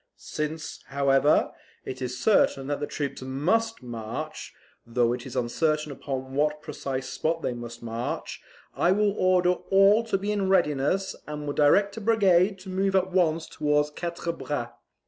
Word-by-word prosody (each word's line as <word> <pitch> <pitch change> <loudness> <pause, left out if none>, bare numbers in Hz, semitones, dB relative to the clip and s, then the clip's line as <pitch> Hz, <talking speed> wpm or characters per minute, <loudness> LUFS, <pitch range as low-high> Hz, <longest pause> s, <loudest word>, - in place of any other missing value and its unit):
Since, 150 +1 -5
however, 140 +1 +3 0.3
it 130 0 -6
is 125 0 -3
certain 135 -6 +3
that 145 +1 -2
the 145 - -3
troops 140 -3 -4
MUST 170 - 0
march, 120 +6 -6 0.3
though 120 0 +1
it 125 +1 -6
is 125 - -9
uncertain 150 +5 0
upon 130 -1 -5
what 150 +2 0
precise 135 -1 -4
spot 160 +4 -2
they 125 - -1
must 120 -1 -8
march, 115 +1 -4 0.3
I 180 - +3
will 210 0 +2
order 185 -2 +3
all 195 +4 +4
to 210 -3 0
be 200 +2 -2
in 200 -2 0
readiness, 175 +1 +1
and 150 0 -5
will 145 - -2
direct 200 +9 +3
a - - -4
brigade 195 -3 +3
to 190 - -10
move 195 +1 0
at 190 0 +2
once 165 -3 +2
towards 150 0 0
Quatre 170 +1 -4
Bras." 145 -7 -4
150 Hz, 165 wpm, -26 LUFS, 135-190 Hz, 0.3 s, all